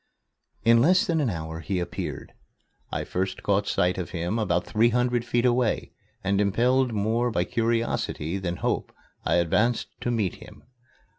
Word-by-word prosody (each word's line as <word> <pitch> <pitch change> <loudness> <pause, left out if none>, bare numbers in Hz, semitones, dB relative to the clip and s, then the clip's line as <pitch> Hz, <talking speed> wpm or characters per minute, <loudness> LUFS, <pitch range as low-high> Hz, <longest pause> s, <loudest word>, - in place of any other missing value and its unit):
In 115 0 +6
less 185 - +4
than 165 -6 +1
an 135 - +1
hour 80 -3 -5
he 95 +3 -2
appeared. 90 - -5 0.6
I - - -2
first 95 +1 -3
caught 100 0 +1
sight 90 +2 +1
of 90 - -4
him 90 +6 -2
about 90 -5 0
three 115 +2 +3
hundred 120 0 +1
feet 120 0 0
away, 120 -2 +1 0.3
and, 100 +1 +2
impelled 125 +5 +2
more 110 +3 +1
by 90 -6 +1
curiosity 115 -6 -1
than 90 -2 -2
hope, - - -2 0.3
I - - +2
advanced 105 +8 +2
to - - -1
meet 110 -7 0
him. - - -14
110 Hz, 160 wpm, -26 LUFS, 90-120 Hz, 0.6 s, In